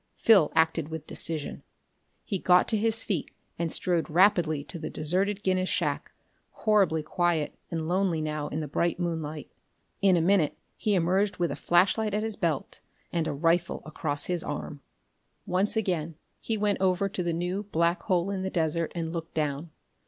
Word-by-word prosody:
Phil 195 Hz, -9 st, +5 dB
acted 160 Hz, -1 st, +2 dB
with 160 Hz, -1 st, -6 dB
decision. 155 Hz, -3 st, -2 dB, 0.6 s
He 195 Hz, -, -3 dB
got 180 Hz, 0 st, +4 dB
to 225 Hz, -, +1 dB
his 225 Hz, +1 st, +1 dB
feet 185 Hz, -8 st, -2 dB, 0.3 s
and 170 Hz, -1 st, -1 dB
strode 175 Hz, -3 st, 0 dB
rapidly 165 Hz, -4 st, +3 dB
to 170 Hz, -, -8 dB
the 155 Hz, -, -5 dB
deserted 190 Hz, +6 st, 0 dB
Guinness 185 Hz, 0 st, +1 dB
shack, -, -, -1 dB, 0.4 s
horribly 195 Hz, -8 st, +2 dB
quiet 170 Hz, -1 st, 0 dB, 0.2 s
and 165 Hz, -2 st, -3 dB
lonely 180 Hz, -2 st, +1 dB
now 155 Hz, -1 st, -2 dB
in 155 Hz, -, -3 dB
the 150 Hz, -, -4 dB
bright 170 Hz, +5 st, 0 dB
moonlight. 160 Hz, -3 st, -4 dB, 0.5 s
In 190 Hz, -3 st, +5 dB
a -, -, +3 dB
minute 175 Hz, -3 st, +2 dB, 0.2 s
he 210 Hz, -2 st, 0 dB
emerged 190 Hz, +4 st, +1 dB
with 175 Hz, -2 st, 0 dB
a -, -, -3 dB
flashlight 200 Hz, +4 st, +2 dB
at 215 Hz, -, 0 dB
his 220 Hz, -1 st, 0 dB
belt 165 Hz, -9 st, -2 dB, 0.3 s
and 165 Hz, -2 st, 0 dB
a -, -, -1 dB
rifle 165 Hz, +4 st, +1 dB
across 150 Hz, -2 st, -2 dB
his 180 Hz, -2 st, -1 dB
arm. 145 Hz, 0 st, -5 dB, 0.6 s
Once 195 Hz, +5 st, +1 dB
again 170 Hz, -6 st, -1 dB, 0.2 s
he 225 Hz, -, -2 dB
went 205 Hz, -2 st, 0 dB
over 190 Hz, +1 st, +2 dB
to 195 Hz, -1 st, -4 dB
the 175 Hz, -1 st, -1 dB
new 180 Hz, +4 st, -2 dB
black 170 Hz, +2 st, +1 dB
hole 185 Hz, -1 st, 0 dB
in 195 Hz, -1 st, -2 dB
the 190 Hz, -, -2 dB
desert 165 Hz, -2 st, 0 dB
and 165 Hz, -1 st, -3 dB
looked 165 Hz, -1 st, -6 dB
down. 150 Hz, +1 st, -2 dB
175 Hz, 175 wpm, -28 LUFS, 160-195 Hz, 0.6 s, Phil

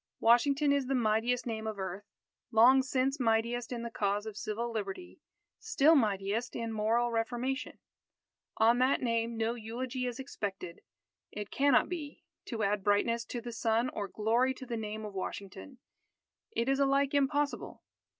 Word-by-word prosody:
Washington 280 Hz, +5 st, +4 dB
is 280 Hz, -2 st, 0 dB
the 270 Hz, -, 0 dB
mightiest 235 Hz, +1 st, +1 dB
name 220 Hz, -2 st, -4 dB
of 215 Hz, -1 st, -4 dB
earth 190 Hz, +1 st, -5 dB, 0.4 s
long 250 Hz, +3 st, +6 dB
since 265 Hz, +2 st, 0 dB
mightiest 235 Hz, +1 st, 0 dB
in 235 Hz, -1 st, -4 dB
the 235 Hz, -, -5 dB
cause 205 Hz, -1 st, -1 dB
of 220 Hz, -2 st, -6 dB
Civil 220 Hz, +3 st, -3 dB
Liberty; 210 Hz, -, -6 dB, 0.4 s
still 330 Hz, -9 st, +4 dB
mightiest 215 Hz, -3 st, 0 dB
in 230 Hz, -1 st, -3 dB
moral 230 Hz, +3 st, +1 dB
reformation. 240 Hz, +4 st, -2 dB, 0.8 s
On 230 Hz, +2 st, +4 dB
that 260 Hz, +1 st, +2 dB
name 230 Hz, -1 st, 0 dB
no 225 Hz, +1 st, 0 dB
eulogy 245 Hz, +3 st, -4 dB
is 245 Hz, -1 st, -4 dB
expected. 195 Hz, -9 st, -6 dB, 0.5 s
It 210 Hz, 0 st, -6 dB
cannot 280 Hz, -2 st, +3 dB
be. 310 Hz, -5 st, -6 dB, 0.2 s
To 225 Hz, -4 st, -3 dB
add 200 Hz, 0 st, 0 dB
brightness 230 Hz, +3 st, +1 dB
to 240 Hz, -, -5 dB
the 240 Hz, 0 st, -6 dB
sun 225 Hz, +2 st, +1 dB
or 205 Hz, -4 st, -4 dB
glory 235 Hz, +6 st, +1 dB
to 260 Hz, -, -9 dB
the 240 Hz, -2 st, -4 dB
name 215 Hz, -1 st, -5 dB
of 210 Hz, -, -7 dB
Washington, 190 Hz, -, -6 dB, 0.8 s
is 270 Hz, +4 st, +1 dB
alike 275 Hz, 0 st, +2 dB
impossible. 285 Hz, +1 st, 0 dB
235 Hz, 155 wpm, -31 LUFS, 215-260 Hz, 0.8 s, long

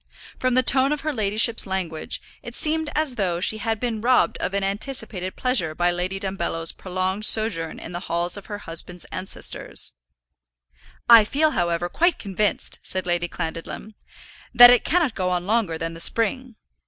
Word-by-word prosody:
From 255 Hz, -1 st, 0 dB
the 255 Hz, -, +4 dB
tone 265 Hz, +2 st, +3 dB
of 300 Hz, -1 st, -2 dB
her 310 Hz, -1 st, -2 dB
ladyship's 220 Hz, 0 st, +1 dB
language, 180 Hz, -5 st, -4 dB, 0.2 s
it 235 Hz, -, -9 dB
seemed 315 Hz, 0 st, -1 dB
as 305 Hz, -3 st, 0 dB
though 180 Hz, -4 st, -1 dB
she 215 Hz, +4 st, +1 dB
had 225 Hz, -1 st, -2 dB
been 230 Hz, -3 st, -3 dB
robbed 250 Hz, +2 st, +2 dB
of 190 Hz, -, -2 dB
an 200 Hz, -, 0 dB
anticipated 195 Hz, -2 st, -2 dB
pleasure 210 Hz, -12 st, +1 dB
by 175 Hz, +1 st, +1 dB
Lady 180 Hz, +2 st, -3 dB
Dumbello's 170 Hz, -4 st, -3 dB
prolonged 185 Hz, +2 st, -3 dB
sojourn 215 Hz, -8 st, +3 dB
in -, -, -8 dB
the 175 Hz, -, -5 dB
halls 170 Hz, +1 st, +1 dB
of 200 Hz, -, -8 dB
her 205 Hz, -, -5 dB
husband's 175 Hz, -1 st, -6 dB
ancestors. 185 Hz, +1 st, -5 dB, 1.1 s
"I 230 Hz, -2 st, +9 dB
feel, 305 Hz, +8 st, +1 dB
however, 175 Hz, -, -1 dB
quite 345 Hz, -, +1 dB
convinced," 205 Hz, 0 st, -2 dB
said 185 Hz, -1 st, -4 dB
Lady 175 Hz, 0 st, -1 dB
Clandidlem, 165 Hz, +5 st, -6 dB, 0.6 s
"that 245 Hz, 0 st, +10 dB
it 245 Hz, -, +4 dB
cannot 330 Hz, -7 st, +1 dB
go 185 Hz, -2 st, -2 dB
on 180 Hz, -1 st, -2 dB
longer 205 Hz, -6 st, 0 dB
than 165 Hz, 0 st, -4 dB
the 165 Hz, -, -10 dB
spring. 235 Hz, +6 st, +1 dB
200 Hz, 170 wpm, -23 LUFS, 175-245 Hz, 1.1 s, that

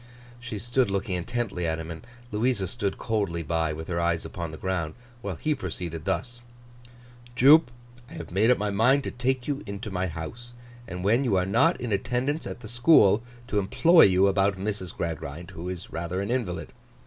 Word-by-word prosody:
She 120 Hz, -3 st, -6 dB
stood 120 Hz, +3 st, +1 dB
looking 100 Hz, -1 st, -2 dB
intently 95 Hz, -1 st, -2 dB
at 80 Hz, 0 st, 0 dB
him, 80 Hz, +1 st, -6 dB
and 80 Hz, -, -7 dB, 0.3 s
Louisa 110 Hz, -1 st, +1 dB
stood 100 Hz, -1 st, -2 dB
coldly 100 Hz, -8 st, -1 dB
by, 80 Hz, 0 st, 0 dB
with 80 Hz, +1 st, -6 dB
her 85 Hz, -1 st, -1 dB
eyes 85 Hz, -1 st, 0 dB
upon 85 Hz, -2 st, -5 dB
the 80 Hz, -, -8 dB
ground, 90 Hz, -4 st, -2 dB, 0.3 s
while 100 Hz, -5 st, -4 dB
he 155 Hz, -, 0 dB
proceeded 85 Hz, -, -5 dB
thus: 120 Hz, +5 st, -2 dB, 0.9 s
'Jupe, 140 Hz, +3 st, +7 dB, 0.4 s
I -, -, -12 dB
have 85 Hz, 0 st, -8 dB
made 105 Hz, +6 st, +3 dB
up 125 Hz, -, +5 dB
my 105 Hz, 0 st, -1 dB
mind 125 Hz, +7 st, +3 dB
to -, -, -4 dB
take 125 Hz, 0 st, -1 dB
you 145 Hz, -1 st, -2 dB
into 100 Hz, +2 st, -6 dB
my 95 Hz, 0 st, -1 dB
house; 115 Hz, +10 st, -7 dB, 0.3 s
and, 90 Hz, 0 st, -6 dB
when 115 Hz, +7 st, +3 dB
you 120 Hz, -7 st, +1 dB
are 90 Hz, -1 st, +2 dB
not 130 Hz, -, +3 dB
in 120 Hz, -3 st, -4 dB
attendance 125 Hz, +9 st, -1 dB
at -, -, -7 dB
the 110 Hz, -, -8 dB
school, 120 Hz, -3 st, +5 dB, 0.3 s
to 105 Hz, -, +1 dB
employ 160 Hz, -, +6 dB
you 95 Hz, 0 st, +4 dB
about 100 Hz, 0 st, +2 dB
Mrs. 95 Hz, -2 st, -3 dB
Gradgrind, 80 Hz, 0 st, -5 dB
who 85 Hz, +2 st, -6 dB
is 90 Hz, -1 st, -7 dB
rather 85 Hz, +3 st, -3 dB
an 100 Hz, +4 st, -2 dB
invalid. 115 Hz, -9 st, -2 dB
100 Hz, 195 wpm, -26 LUFS, 90-120 Hz, 0.9 s, Jupe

